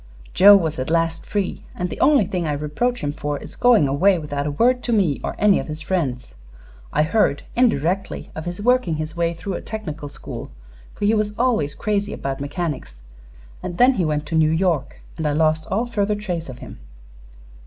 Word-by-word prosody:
"Joe 205 +2 +9
was 160 -7 0
at 130 - -3
last 165 0 0
free, 200 -3 -2
and 180 - -2
the - - -6
only 280 -7 +5
thing 175 -2 -2
I 150 - 0
reproach 150 +13 -1
him 145 - 0
for 145 -1 -3
is - - -10
going 240 - +4
away 180 +8 +3
without 145 -2 -3
a - - -1
word 250 - +2
to 240 - -1
me 190 -11 +2
or - - -3
any 205 -1 +4
of - - -5
his 155 +1 -6
friends. 135 - -2 0.6
I 150 - +2
heard, 155 -4 +1
indirectly, 195 - 0
of 155 - -6
his 175 +1 -5
working 245 -6 +2
his 155 +1 -4
way 170 0 0
through 195 +3 -5
a - - -4
technical 165 -9 -6
school, - - -8 0.5
for 205 - -2
he 210 - +4
was 210 -1 0
always 230 - +1
crazy 205 -1 -1
about 135 0 -4
mechanics, 140 - -4 0.6
and 175 -1 -5
then 255 +5 +6
he 195 - 0
went 150 -1 -1
to 160 - -4
New 155 -1 +4
York 160 -3 0 0.2
and 160 -2 -1
I 145 - +1
lost 155 +1 +1
all 220 +5 0
further 210 -3 0
trace 180 -7 -4
of 125 - -8
him." - - -11
170 Hz, 205 wpm, -22 LUFS, 150-205 Hz, 0.6 s, Joe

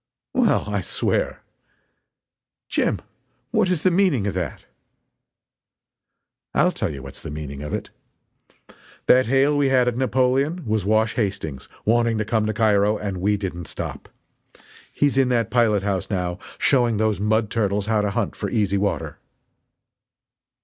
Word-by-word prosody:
"Well, - - +3
I 100 -1 -1
swear!" - - -1 1.2
"Jim, - - 0 0.5
what - - +2
is 180 -4 0
the 185 - +4
meaning 175 - +2
of 100 - -1
that?" 90 -5 -4 1.9
"I'll - - +4
tell - - -2
you 70 -2 -8
what's 70 - -10
the - - -7
meaning 75 -2 -6
of 75 - -6
it. - - -4 1.1
That 130 -2 +5
hail 135 +3 +3
we 145 -1 +2
had 130 -2 +3
at 125 - 0
Napoleon 130 +5 +1
was 110 -3 0
Wash 110 +2 +2
Hastings, 95 - -3 0.2
wanting 115 0 +2
to 110 - -1
come 110 0 0
to 110 - -1
Cairo 105 -1 +3
and 100 -3 -4
we 100 +3 +1
didn't 90 -4 -5
stop. - - -6 0.8
He's 140 -2 +2
in 130 -1 +3
that 120 -2 +1
pilot 110 -5 +3
house, 100 -3 -2
now, 90 -2 -2 0.2
showing 120 -5 +2
those 110 -1 +1
mud 110 +1 +1
turtles 100 -2 0
how 110 -1 +1
to 105 - 0
hunt - - -2
for - - -3
easy 100 -3 +1
water." 100 +1 -2
110 Hz, 150 wpm, -23 LUFS, 100-125 Hz, 1.9 s, That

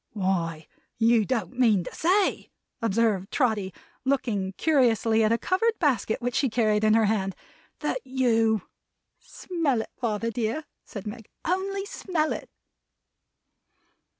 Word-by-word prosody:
"Why 170 -6 -1 0.3
you 225 -1 +4
don't 245 -1 -2
mean 215 -7 +4
to - - -8
say," 375 +4 +1 0.3
observed 215 -3 +1
Trotty, 220 -8 +1 0.3
looking 230 -8 0
curiously 230 -6 +3
at 215 - +3
a 230 - +3
covered 450 - +1
basket 255 - 0
which 245 0 -1
she 270 - +1
carried 215 -2 +2
in 215 0 +5
her 225 -1 +4
hand, 195 -3 0 0.5
"that - - -1
you 230 -5 +2 0.3
" - - -55
"Smell 325 -9 -2
it, - - -16
father 230 -1 -2
dear," 230 +6 -2 0.2
said 205 - -8
Meg, 215 +1 -8 0.2
"Only 390 +2 -1
smell 340 -6 -1
it!" - - -7
230 Hz, 135 wpm, -26 LUFS, 210-275 Hz, 0.5 s, in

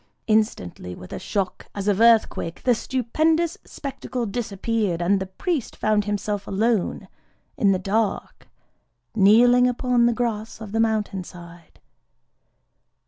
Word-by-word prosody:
_"… - - -38 0.2
Instantly 210 - -1
with 90 - -11
a - - -4
shock 195 -3 -3
as 200 0 -4
of 205 +1 +2
earthquake 225 -7 +3
the 250 - +4
stupendous 310 +8 0
spectacle 255 -4 -5
disappeared; 210 -3 -2
and 190 +3 +2
the 190 - -4
priest 280 - -3
found 210 -1 +1
himself 205 0 -3
alone 215 0 0 0.5
in 200 - +3
the 190 - +2
dark, 200 +2 -2 0.7
kneeling 240 +4 +5
upon 245 -1 +2
the 240 - +2
grass 225 -3 -3
of 215 -3 -8
the 225 - -1
mountain 215 -4 0
side. 170 -2 -14
215 Hz, 135 wpm, -23 LUFS, 195-235 Hz, 0.7 s, kneeling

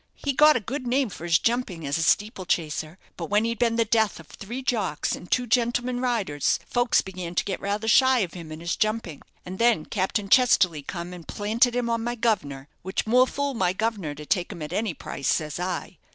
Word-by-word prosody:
He 280 - -2
got 300 +3 +6
a - - +2
good 255 +4 -5
name 260 0 +1
for 175 - -8
his 165 -1 +4
jumping 225 -9 -1
as 140 +3 -1
a - - 0
steeple 190 - +1
chaser; 160 0 -2 0.2
but - - -4
when 210 +2 +2
he'd 230 -1 -2
been 235 -2 +2
the 230 0 +2
death 220 -4 +1
of 165 - -12
three 235 - -8
jocks 200 -12 -1
and 180 - -12
two 250 - +1
gentlemen 245 +1 +1
riders, 220 - 0
folks 245 -1 +2
began 180 -2 -7
to - - +2
get 195 - -3
rather 205 +2 -2
shy 260 +3 +5
of 180 -4 -3
him 165 -3 -9
and 155 +1 -8
his 170 - -1
jumping; 215 -8 -2 0.2
and 185 +1 -7
then 230 -9 +3
Captain 200 0 -1
Chesterly 195 - +4
come 170 +4 -6
and 175 -2 -11
planted 230 +4 +1
him 245 -1 0
on 230 -1 -1
my 240 +1 -2
guv'nor, 185 - -1
which 190 +2 -2
more 250 +3 +4
fool 285 +1 -2
my 185 -6 +1
governor 200 -8 -2
to 150 +1 -9
take 175 +3 0
him 165 - -7
at 150 - -6
any 210 -6 -1
price, 140 - -5
says 155 +1 0
I. 180 -2 -4
205 Hz, 225 wpm, -25 LUFS, 170-240 Hz, 0.2 s, got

